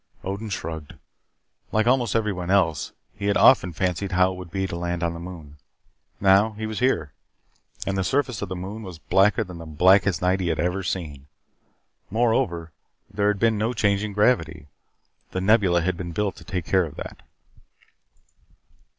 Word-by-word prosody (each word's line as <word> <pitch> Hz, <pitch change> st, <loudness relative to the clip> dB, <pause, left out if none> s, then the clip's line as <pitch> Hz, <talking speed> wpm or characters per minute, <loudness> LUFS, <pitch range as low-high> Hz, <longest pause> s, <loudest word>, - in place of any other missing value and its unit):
Odin 100 Hz, +3 st, -4 dB
shrugged. 80 Hz, -5 st, -5 dB, 0.8 s
Like 110 Hz, 0 st, +2 dB
almost 120 Hz, -3 st, +2 dB
everyone 100 Hz, -6 st, -1 dB
else, 85 Hz, -7 st, +2 dB, 0.2 s
he 100 Hz, 0 st, -4 dB
had 100 Hz, -, +3 dB
often 90 Hz, -, +5 dB
fancied 95 Hz, +3 st, -2 dB
how 90 Hz, +1 st, +4 dB
it -, -, -6 dB
would 90 Hz, -2 st, -9 dB
be 95 Hz, +2 st, -2 dB
to 90 Hz, -, -5 dB
land 85 Hz, 0 st, -3 dB
on 85 Hz, -1 st, 0 dB
the 85 Hz, -, -7 dB
moon. 85 Hz, -4 st, -10 dB, 0.6 s
Now 100 Hz, +3 st, +4 dB
he 110 Hz, +1 st, -5 dB
was 110 Hz, -1 st, -4 dB
here, 85 Hz, -, 0 dB, 0.7 s
and 95 Hz, -, -1 dB
the 95 Hz, -, 0 dB
surface 130 Hz, +2 st, 0 dB
of 100 Hz, -, -4 dB
the 95 Hz, -, -4 dB
moon 95 Hz, +5 st, -6 dB
was 95 Hz, -6 st, -8 dB
blacker 95 Hz, +6 st, +2 dB
than 90 Hz, -4 st, -10 dB
the 80 Hz, -, -9 dB
blackest 95 Hz, +4 st, +4 dB
night 90 Hz, +1 st, +1 dB
he 90 Hz, -, -1 dB
had 85 Hz, -, -1 dB
ever 90 Hz, +2 st, 0 dB
seen. 75 Hz, -7 st, -5 dB, 0.8 s
Moreover, 110 Hz, -7 st, 0 dB, 0.4 s
there 100 Hz, 0 st, 0 dB
had 105 Hz, 0 st, +2 dB
been 110 Hz, 0 st, +2 dB
no 115 Hz, +3 st, 0 dB
change 105 Hz, -3 st, +1 dB
in 105 Hz, -1 st, -4 dB
gravity. 90 Hz, -, +1 dB, 0.7 s
The 95 Hz, -, -1 dB
Nebula 95 Hz, -4 st, +3 dB
had 90 Hz, 0 st, -1 dB
been 85 Hz, -1 st, -6 dB
built 100 Hz, +3 st, -1 dB
to -, -, -12 dB
take 90 Hz, -4 st, -4 dB
care 95 Hz, -2 st, +2 dB
of 75 Hz, -, -9 dB
that. -, -, -8 dB
95 Hz, 180 wpm, -24 LUFS, 85-105 Hz, 0.8 s, often